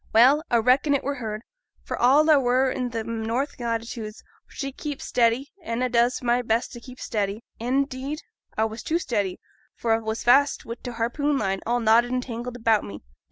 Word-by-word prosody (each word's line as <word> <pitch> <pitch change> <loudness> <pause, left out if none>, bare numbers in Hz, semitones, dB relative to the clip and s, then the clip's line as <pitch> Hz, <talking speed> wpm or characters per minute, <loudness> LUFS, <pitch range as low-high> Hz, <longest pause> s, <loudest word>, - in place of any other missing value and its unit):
Well, 255 +7 +6
a 235 - +4
reckon 260 +5 +3
it 275 - -1
were 280 0 -2
heerd, 215 -1 -5 0.4
for - - -4
all 280 +6 +4
a 305 -3 +6
were 255 +1 +2
i' 250 - -1
them 230 -1 -4
north 245 +6 -2
latitudes, 230 -2 -4 0.2
for - - -25
she 275 -1 -3
keeps 295 -2 -6
steady, 240 +3 +1
an' 235 -4 -2
a 255 - +1
does 240 +1 +2
my 240 0 +2
best 230 0 0
for 240 - -8
t' - - -23
keep 255 -1 -11
steady; 210 -1 -2 0.2
an' 255 +4 +1
'deed 275 +3 -6 0.3
a 220 - +3
was 220 +1 -5
too 325 - 0
steady, 205 - -2 0.4
for 230 -1 0
a 225 - +2
was 220 0 -3
fast 275 +4 +4
wi' 230 - -4
t' - - -5
harpoon 245 +5 0
line, 195 -4 -1
all 240 +1 +2
knotted 230 +1 +4
and 255 0 0
tangled 240 0 -6
about 225 -3 +2
me. 100 -6 -9
240 Hz, 210 wpm, -25 LUFS, 225-265 Hz, 0.4 s, Well